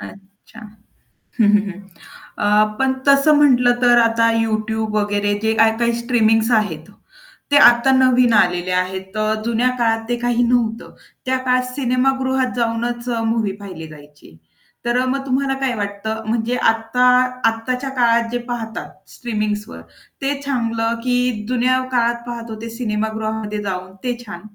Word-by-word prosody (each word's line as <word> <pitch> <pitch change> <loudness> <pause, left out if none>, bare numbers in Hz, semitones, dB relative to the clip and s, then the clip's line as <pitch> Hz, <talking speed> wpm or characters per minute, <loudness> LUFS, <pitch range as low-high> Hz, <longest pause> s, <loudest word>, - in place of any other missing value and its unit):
अच्छा. 200 +3 -14 0.8
हं, 215 - +5
हं, 210 0 +4
हं. 190 +2 -12 0.6
अ, 205 - 0 0.3
पण 265 0 +2
तसं 280 +2 +5
म्हटलं 250 -4 +4
तर 240 -1 +5
आता 230 0 +2
YouTube 220 -1 -2
वगैरे 205 0 0
जे 220 0 +2
काही-काही 225 +1 +3
स्ट्रीमिंग्स 225 -1 +2
आहेत, 165 -6 -3 0.6
ते 285 - +6
आता 240 +2 +2
नवीन 255 -2 +4
आलेले 180 -1 0
आहेत. 185 +1 -3
तर 215 0 -1
जुन्या 235 +2 +1
काळात 225 -1 +1
ते 240 - +1
काही 245 0 +1
नव्हतं. 230 -2 -1 0.3
त्या 260 0 0
काळात 255 0 +2
सिनेमागृहात 260 0 0
जाऊनच 240 +1 -2
अ, 230 -1 -1
मूव्ही 220 -3 0
पाहिली 180 -5 -8
जायची. 145 - -17 0.5
तर 240 +1 +1
अ, - - -1
मग 270 +1 -2
तुम्हाला 270 +1 0
काय 255 -3 0
वाटतं 210 +2 -4
म्हणजे 230 +2 -1 0.2
आत्ता 225 +3 -1 0.4
आत्ताच्या 250 +4 -4
काळात 235 -1 +3
जे 245 - -1
पाहतात, 225 -2 -5 0.2
स्ट्रीमिंग्सवर 210 - -4 0.4
ते 275 +1 -1
चांगलं 230 -4 -1
की 250 0 +1 0.3
जुन्या 255 +1 +1
काळात 235 -1 0
पाहत 235 -1 -6
होते 220 +1 -7
सिनेमागृहामध्ये 220 -2 -3
जाऊन 185 -1 -5
ते 245 -1 -2
छान? 175 -5 -9
230 Hz, 145 wpm, -19 LUFS, 215-250 Hz, 0.8 s, ते